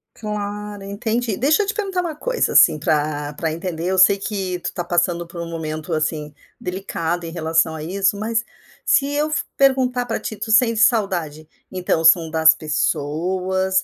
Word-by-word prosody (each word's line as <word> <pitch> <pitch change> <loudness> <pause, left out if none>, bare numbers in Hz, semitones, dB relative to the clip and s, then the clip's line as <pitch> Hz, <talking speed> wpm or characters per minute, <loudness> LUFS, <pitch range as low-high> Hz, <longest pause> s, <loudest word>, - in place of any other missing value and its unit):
Claro, 210 -1 -5
entendi, 220 +2 -2
deixa 310 - +3
eu - - -6
te 425 - -1
perguntar 390 -4 -2
uma 330 -4 -4
coisa - - -1
assim 155 - +6
para 150 0 -1
para 160 +1 -2
entender 170 0 -4
eu 190 +1 0
sei 190 +2 +6
que 190 -3 -3
tu - - -16
está 175 - -4
passando 175 0 0
por 170 0 -8
um 170 - -6
momento 155 0 -5
assim, 155 -1 -2 0.3
delicado 175 -2 -3
em 165 - -6
relação 160 -1 +1
a 155 - -7
isso 195 +4 0
mas, 225 +2 -1 0.4
se 275 - +3
eu 300 +1 0 0.3
perguntar 255 -2 +2
para 225 - -3
ti: 215 - -5
"Tu 220 - -5
sente 230 0 +4
saudade, 170 - +1 0.2
então 180 -3 -1
são 160 0 +6
das 160 0 +5
pessoas, 185 +5 -1
185 Hz, 175 wpm, -21 LUFS, 160-220 Hz, 0.4 s, assim